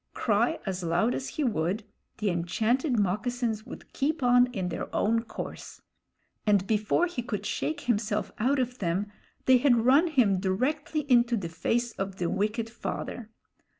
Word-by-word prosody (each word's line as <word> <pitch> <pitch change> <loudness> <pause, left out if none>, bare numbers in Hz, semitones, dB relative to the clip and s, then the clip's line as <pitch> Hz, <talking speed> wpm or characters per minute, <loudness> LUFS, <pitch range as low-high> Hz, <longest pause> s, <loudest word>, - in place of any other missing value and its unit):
Cry 225 +1 +1
as 190 -2 -3
loud 175 +8 +1
as 265 - -3
he 305 - -3
would, 205 - 0 0.3
the 210 -3 0
enchanted 225 - 0
moccasins 220 +3 -1
would - - -11
keep 290 +1 -1
on 245 0 +5
in 190 -7 -3
their - - -4
own 230 +2 +2
course; 225 - -8 0.6
and 205 -3 +3
before 215 - +2
he 340 -8 -4
could 210 -4 -4
shake 305 +6 -2
himself 210 -4 -1
out 265 +6 +2
of 250 -1 -2
them, 195 +3 -1 0.3
they 260 -1 +6
had 240 -4 +3
run 280 +7 +5
him 235 - +3
directly 270 +11 -1
into 240 -4 +3
the 175 -5 -4
face 235 +9 -1
of 195 -2 -4
the 175 -2 -2
wicked 215 +3 -1
father. 230 0 -5
230 Hz, 160 wpm, -28 LUFS, 200-250 Hz, 0.6 s, they